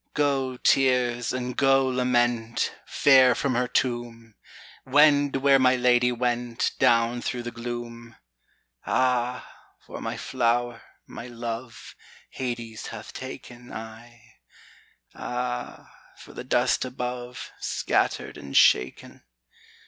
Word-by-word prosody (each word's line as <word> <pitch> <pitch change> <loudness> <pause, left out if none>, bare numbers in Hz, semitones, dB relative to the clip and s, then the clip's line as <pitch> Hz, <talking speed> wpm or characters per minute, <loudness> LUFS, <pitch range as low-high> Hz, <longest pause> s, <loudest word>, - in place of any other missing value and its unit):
Go, 135 -3 0
tears, 125 -3 +2
and 125 -1 -4
go, 135 0 +3
lament, 120 -2 0
Fare 130 -2 +5
from 140 - -1
her 125 +1 0
tomb, 120 -2 -2 0.5
Wend 145 0 +4
where 135 0 +4
my 130 0 +4
lady 125 0 +3
went 120 -1 -1
Down 115 +1 +3
through 120 -1 -3
the 120 - -5
gloom! 120 0 -7 0.7
Ah, 125 -1 0 0.3
for - - -10
my - - -4
flower, 120 -1 -1 0.2
my 120 - -9
love, 115 0 -7 0.4
Hades 120 -3 -5
hath - - -9
taken 120 0 -9
I 115 0 -11 0.7
Ah, 125 0 -5 0.2
for - - -14
the - - -7
dust - - +1
above 125 -1 -6
Scattered - - -1
and 70 -1 -3
shaken! 65 +1 +3
120 Hz, 110 wpm, -25 LUFS, 120-130 Hz, 0.7 s, Fare